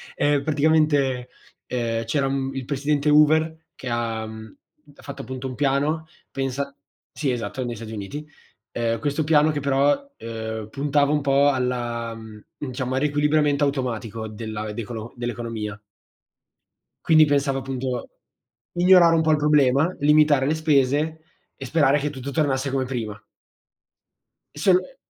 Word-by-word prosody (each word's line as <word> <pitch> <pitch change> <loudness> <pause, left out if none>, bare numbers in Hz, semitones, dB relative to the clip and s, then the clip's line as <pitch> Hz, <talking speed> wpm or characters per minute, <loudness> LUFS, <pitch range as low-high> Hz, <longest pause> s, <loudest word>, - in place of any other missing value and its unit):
Ehm, 145 -1 +2
praticamente, 145 -4 +2 0.4
ehm, 115 -2 -2
c'era 135 +4 0
il 135 -1 -3
presidente 145 +2 0
Hoover 160 +2 +3
che 130 - -9
ha 115 -2 -2
mhmm, 110 -1 -10 0.4
ha - - -17
fatto 140 -1 -7
appunto 130 +2 -6
un 130 - -6
piano, 145 +3 0 0.2
pensa 135 +1 -3 0.4
Sì, 140 -4 0
esatto, 125 +2 -3
negli 120 -1 -4
Stati 110 0 -8
Uniti. 125 +9 -6 0.4
Ehm 115 -1 -1
questo 145 +4 -1
piano 155 0 +4
che 145 -1 -3
però, 140 - +1
ehm, 110 -1 -5
puntava 145 +3 +1
un 150 - +1
po' 140 +1 +4
alla 120 -3 -2
mhmm, 110 -1 -12
diciamo, 130 -2 -4
al - - +1
riequilibriamento 150 0 +2
automatico 115 -5 -3
della 110 0 -5
decolo 115 0 -6
dell'economia. 115 -3 -4 1.3
Quindi 155 -1 +6
pensavo 140 -2 +1
appunto, 130 -1 -4 0.6
migliorare 175 -1 +6
un 160 - +3
po' 160 -1 +2
il 155 - +4
problema, 150 +2 +3
limitare 150 -2 +4
le 155 - +1
spese 155 +1 +1 0.3
e 135 - -8
sperare 145 +1 +3
che 145 +1 -2
tutto 140 0 -7
tornasse 135 -2 0
come 135 -1 0
prima. 110 -5 -5 1.4
E - - -6
sol 190 - +4
e 185 +9 -8
135 Hz, 145 wpm, -23 LUFS, 120-150 Hz, 1.4 s, Quindi